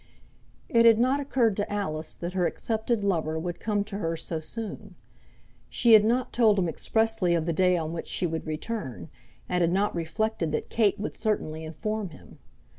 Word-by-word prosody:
It 230 Hz, -1 st, +4 dB
had 225 Hz, -1 st, +7 dB
not 255 Hz, +4 st, +2 dB
occurred 250 Hz, -6 st, +1 dB
to 205 Hz, -, -2 dB
Alice 160 Hz, -7 st, -3 dB
that 175 Hz, +1 st, -5 dB
her 180 Hz, -2 st, +2 dB
accepted 220 Hz, -1 st, -1 dB
lover 160 Hz, -5 st, 0 dB
would 175 Hz, +1 st, -4 dB
come 205 Hz, -2 st, 0 dB
to 200 Hz, -1 st, -6 dB
her 165 Hz, -4 st, -2 dB
so 160 Hz, 0 st, -3 dB
soon. 205 Hz, +2 st, -7 dB, 0.7 s
She 235 Hz, -2 st, +4 dB
had 215 Hz, -1 st, +9 dB
not 240 Hz, +3 st, +1 dB
told 220 Hz, -4 st, +4 dB
him 185 Hz, -2 st, +2 dB
expressly 220 Hz, 0 st, +1 dB
of 165 Hz, -2 st, 0 dB
the 170 Hz, -, 0 dB
day 180 Hz, +2 st, +3 dB
on 160 Hz, -1 st, -3 dB
which 170 Hz, -, -5 dB
she -, -, -1 dB
would 160 Hz, -1 st, -3 dB
return, 155 Hz, -, -5 dB, 0.4 s
and 180 Hz, 0 st, 0 dB
had 170 Hz, 0 st, +3 dB
not 200 Hz, +3 st, +1 dB
reflected 170 Hz, +1 st, -1 dB
that -, -, -3 dB
Kate 215 Hz, -4 st, +2 dB
would 210 Hz, -, -3 dB
certainly 160 Hz, -8 st, -2 dB
inform 205 Hz, +6 st, -3 dB
him. 155 Hz, -, -15 dB
195 Hz, 190 wpm, -27 LUFS, 165-220 Hz, 0.7 s, had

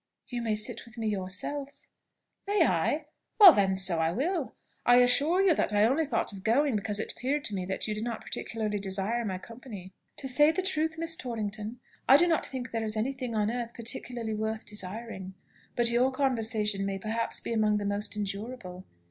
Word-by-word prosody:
"You 245 Hz, -3 st, -3 dB
may 225 Hz, -2 st, 0 dB
sit 215 Hz, +2 st, +1 dB
with 235 Hz, 0 st, -14 dB
me 225 Hz, -1 st, -2 dB
yourself." 210 Hz, +9 st, -3 dB, 0.6 s
"May 400 Hz, -4 st, +3 dB
I? 185 Hz, -, 0 dB, 0.3 s
Well, 390 Hz, -6 st, +11 dB
then, 195 Hz, -4 st, +2 dB
so 190 Hz, -3 st, +3 dB
I 160 Hz, 0 st, +1 dB
will. 290 Hz, -, -2 dB, 0.3 s
I 245 Hz, -, +5 dB
assure 280 Hz, +9 st, +4 dB
you 380 Hz, -3 st, +5 dB
that 215 Hz, -, 0 dB
I 205 Hz, 0 st, +4 dB
only 280 Hz, +6 st, +1 dB
thought 225 Hz, -4 st, -1 dB
of 190 Hz, -1 st, -10 dB
going 255 Hz, +4 st, +2 dB
because 205 Hz, 0 st, -1 dB
it -, -, -3 dB
appeared 285 Hz, +3 st, -2 dB
to 210 Hz, -, +1 dB
me 185 Hz, -2 st, -3 dB
that 190 Hz, -, -2 dB
you 215 Hz, -, -1 dB
did 210 Hz, +1 st, -4 dB
not 235 Hz, -2 st, -4 dB
particularly 215 Hz, -2 st, -3 dB
desire 200 Hz, +4 st, -1 dB
my 190 Hz, -4 st, -3 dB
company." 210 Hz, -3 st, -11 dB, 0.2 s
"To 270 Hz, -, -4 dB
say 295 Hz, +4 st, +5 dB
the 375 Hz, +3 st, -2 dB
truth, 320 Hz, -3 st, 0 dB
Miss 330 Hz, 0 st, +1 dB
Torrington, 220 Hz, -3 st, -5 dB, 0.3 s
I 270 Hz, -, +9 dB
do 345 Hz, +3 st, +5 dB
not 330 Hz, -2 st, +1 dB
think 255 Hz, -1 st, -6 dB
there 225 Hz, -1 st, -2 dB
is 215 Hz, 0 st, -3 dB
any 245 Hz, +6 st, -1 dB
thing 250 Hz, -3 st, -5 dB
on 210 Hz, 0 st, +1 dB
earth 235 Hz, -1 st, -4 dB
particularly 235 Hz, -1 st, -4 dB
worth 220 Hz, +1 st, -3 dB
desiring; 200 Hz, -1 st, -5 dB, 0.4 s
but 235 Hz, -1 st, +3 dB
your 250 Hz, +3 st, +3 dB
conversation 225 Hz, -6 st, +1 dB
may 195 Hz, 0 st, -2 dB
perhaps 220 Hz, +4 st, -2 dB
be -, -, -4 dB
amongst 215 Hz, -2 st, +2 dB
the 205 Hz, -, -3 dB
most 205 Hz, +1 st, -1 dB
endurable. 200 Hz, -2 st, -6 dB
225 Hz, 200 wpm, -29 LUFS, 205-260 Hz, 0.6 s, Well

